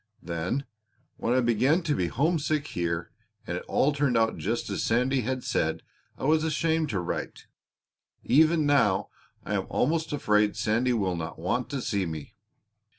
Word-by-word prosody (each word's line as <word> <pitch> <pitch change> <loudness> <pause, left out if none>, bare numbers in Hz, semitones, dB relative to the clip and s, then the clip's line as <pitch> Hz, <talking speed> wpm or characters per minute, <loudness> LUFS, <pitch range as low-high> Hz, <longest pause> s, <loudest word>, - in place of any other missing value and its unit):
Then 85 - -2 0.5
when 120 - 0
I 130 - +4
began 130 - +2
to 155 -3 +1
be 90 - 0
homesick 150 - 0
here 85 -1 -2 0.3
and - - -3
it - - -4
all 145 +2 +2
turned 140 -4 +1
out 115 0 +2
just 115 +4 -2
as - - -2
Sandy 125 +3 +2
had 130 +2 -2
said - - -1 0.3
I - - -9
was 155 +3 +3
ashamed 160 0 +1
to 100 - -1
write. 90 - -4 0.8
Even 155 +4 +4
now 115 -10 +3 0.4
I - - -3
am - - -1
almost 160 +4 0
afraid 105 -7 +2
Sandy 120 +3 +1
will 95 -6 0
not 80 -1 -5
want 115 +10 -1
to 140 -4 -3
see 100 -4 -1
me." 80 -3 -7
125 Hz, 165 wpm, -27 LUFS, 100-150 Hz, 0.8 s, I